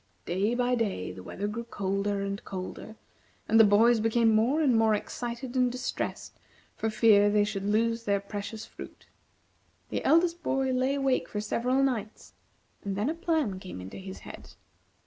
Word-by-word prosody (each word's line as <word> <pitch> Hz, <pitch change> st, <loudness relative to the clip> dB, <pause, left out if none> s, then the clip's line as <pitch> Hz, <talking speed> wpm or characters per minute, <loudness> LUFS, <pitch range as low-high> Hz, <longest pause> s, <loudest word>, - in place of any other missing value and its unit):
Day 200 Hz, +7 st, 0 dB
by 245 Hz, 0 st, +1 dB
day 210 Hz, -, -1 dB
the 95 Hz, -, -10 dB
weather 195 Hz, -, -5 dB
grew 225 Hz, +3 st, -4 dB
colder 200 Hz, -1 st, -2 dB
and 200 Hz, 0 st, -4 dB
colder, 190 Hz, +3 st, -7 dB, 0.5 s
and 225 Hz, -, +4 dB
the -, -, +10 dB
boys 220 Hz, +3 st, +5 dB
became 225 Hz, +1 st, +3 dB
more 235 Hz, +8 st, +3 dB
and 275 Hz, -6 st, +3 dB
more 225 Hz, -1 st, +4 dB
excited 240 Hz, +4 st, -5 dB
and 250 Hz, -1 st, +3 dB
distressed 250 Hz, +1 st, -4 dB, 0.4 s
for 225 Hz, -, -1 dB
fear 215 Hz, -2 st, +5 dB
they 205 Hz, 0 st, +3 dB
should 205 Hz, -1 st, -3 dB
lose 230 Hz, +2 st, +1 dB
their 200 Hz, -1 st, +2 dB
precious 205 Hz, +2 st, -6 dB
fruit. -, -, -12 dB, 0.8 s
The -, -, -3 dB
eldest 340 Hz, +1 st, +3 dB
boy 270 Hz, -3 st, 0 dB
lay 260 Hz, +2 st, +1 dB
awake 270 Hz, -2 st, 0 dB
for 210 Hz, -, -3 dB
several 250 Hz, +5 st, 0 dB
nights, 225 Hz, -5 st, -3 dB, 0.5 s
and 200 Hz, -1 st, -3 dB
then 210 Hz, +9 st, 0 dB
a -, -, -2 dB
plan 320 Hz, -, -1 dB
came 185 Hz, -, -8 dB
into 95 Hz, +1 st, -8 dB
his 190 Hz, 0 st, -8 dB
head. -, -, -11 dB
220 Hz, 170 wpm, -28 LUFS, 200-250 Hz, 0.8 s, the